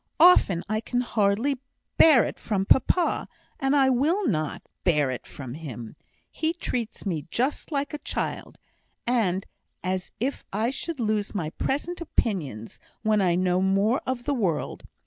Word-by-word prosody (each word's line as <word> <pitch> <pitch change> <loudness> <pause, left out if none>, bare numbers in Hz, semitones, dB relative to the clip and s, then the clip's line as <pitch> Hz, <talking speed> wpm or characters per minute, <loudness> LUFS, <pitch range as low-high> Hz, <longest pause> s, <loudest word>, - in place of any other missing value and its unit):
Often 255 - +6
I 215 +1 0
can 245 +2 -1
hardly 230 +4 +1 0.4
bear 300 -8 +7
it - - -4
from 195 -3 -1
papa, 340 - +3 0.3
and 270 +1 +2
I 270 -2 +5
will 315 +10 +2
not 155 -6 -1 0.2
bear 150 -6 +3
it 125 - -6
from 130 -4 -8
him. 125 -7 -7 0.4
He 320 +1 -1
treats 240 -12 -4
me 165 -7 -2
just 260 - -1
like 285 0 -1
a 300 - -3
child, - - -4 0.5
and 205 -6 +1 0.4
as 185 0 -2
if 265 +5 -2
I 220 +5 0
should 320 +2 -4
lose 215 -2 0
all - - -2
my 155 -5 -2
present 330 - -2
opinions 155 - -2 0.2
when 215 -2 +3
I 175 -3 +3
know 180 0 +2
more 195 +6 +2
of 255 -1 -2
the 285 - 0
world. 195 - -1
215 Hz, 160 wpm, -26 LUFS, 180-270 Hz, 0.5 s, bear